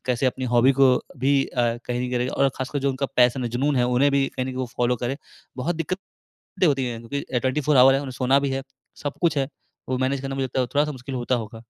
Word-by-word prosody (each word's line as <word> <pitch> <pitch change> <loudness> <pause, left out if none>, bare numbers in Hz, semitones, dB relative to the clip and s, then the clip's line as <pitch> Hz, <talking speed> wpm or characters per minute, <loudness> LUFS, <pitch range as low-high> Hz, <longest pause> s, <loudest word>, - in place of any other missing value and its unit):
कैसे 125 +1 +1
अपनी 130 0 -1
हॉबी 125 +3 +5
को 135 -1 +5 0.2
भी 135 +2 +3
अ, 120 -2 0
कैरी 125 0 -2
करें 125 0 0
और 135 +1 +2
ख़ासकर 135 +2 -3
जो 140 0 +1
उनका 135 +1 -2
पैशन 125 +1 +4
है, 120 - -1
जुनून 135 +4 0
है, 125 - +3
उन्हें 125 +3 +3
भी 140 -1 +3
कहीं 130 - -2
न - - -4
कहीं 130 - -5
वो 130 0 -2
फॉलो 125 0 +1
करें। 120 +3 -3 0.4
बहुत 160 +7 -1
दिक्कतें 185 +4 -5 0.5
होती 135 -3 +1
है 120 - -4
क्योंकि 130 +1 -3
24 140 +3 +1
आवर 130 +1 +8
है 135 - +2
उन्हें 135 -2 -6
सोना 130 +2 +2
भी 140 - 0
है 135 0 -2 0.4
सब 145 -1 -2
कुछ 165 -4 +2
है। 135 - +1 0.4
वो 130 - 0
मैनेज 130 +1 0
करना 135 0 -4
मुझे 135 -1 -1
लगता 130 0 -3
है 125 - -1
थोड़ा-सा 150 +1 +2
मुश्किल 130 0 -7
होता 125 +1 0
होगा। 115 -1 -6
130 Hz, 250 wpm, -24 LUFS, 125-140 Hz, 0.5 s, आवर